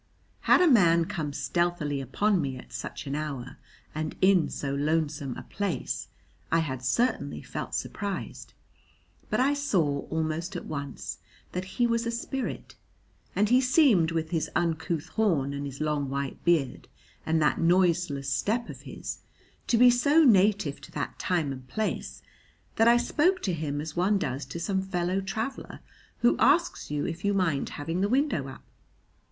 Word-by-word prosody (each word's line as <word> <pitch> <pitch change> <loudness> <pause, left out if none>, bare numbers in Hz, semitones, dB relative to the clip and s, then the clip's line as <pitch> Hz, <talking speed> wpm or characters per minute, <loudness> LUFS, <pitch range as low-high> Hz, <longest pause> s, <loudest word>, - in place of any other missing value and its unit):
Had - - +7
a 360 - +6
man 170 - +5
come 155 -4 -3
stealthily 145 0 -1
upon 190 - +1
me 135 -3 -3
at - - -13
such - - -6
an 140 - -4
hour 145 -4 -4 0.4
and 155 0 -3
in 190 -3 +4
so 140 -1 -3
lonesome 145 -2 -1
a - - -7
place 200 -3 -3 0.4
I - - +4
had 130 -6 -2
certainly 235 - 0
felt - - -5
surprised; 200 -2 -5 0.7
but - - 0
I 270 +3 +3
saw 175 - 0
almost 160 +3 -2
at 175 - -5
once 140 -2 -5 0.3
that 180 +1 -3
he 240 - +4
was 230 0 0
a - - 0
spirit, 245 +3 -4 0.6
and 210 +1 +2
he 250 +2 +5
seemed 250 - +4
with 160 -1 -2
his 165 -3 -1
uncouth 165 -1 -1
horn 165 -11 +1
and 140 0 -4
his 135 0 -8
long 150 -3 -1
white 140 0 -4
beard 155 -7 +1 0.4
and 160 0 +1
that 150 -1 +2
noiseless 170 -5 +2
step 210 - 0
of - - -8
his - - -7 0.5
to 235 - +3
be 245 +1 +8
so 285 +6 +4
native 200 - +3
to - - -12
that 145 - -4
time 165 -6 0
and 130 -1 -8
place 215 +11 -3 0.5
that 225 - +5
I 235 0 +7
spoke 350 +9 +2
to 185 - 0
him 150 -3 -3
as 155 +1 -6
one 190 +4 +2
does 135 -6 -3
to 135 +6 -7
some 190 +2 0
fellow 185 0 -1
traveller 220 +7 -4 0.4
who 240 - +3
asks 340 +6 +3
you 145 0 -1
if 165 +2 -5
you 200 0 +1
mind 165 -8 0
having 165 +5 -2
the 200 - +1
window 260 - +1
up. 135 - -10
170 Hz, 170 wpm, -28 LUFS, 145-210 Hz, 0.7 s, be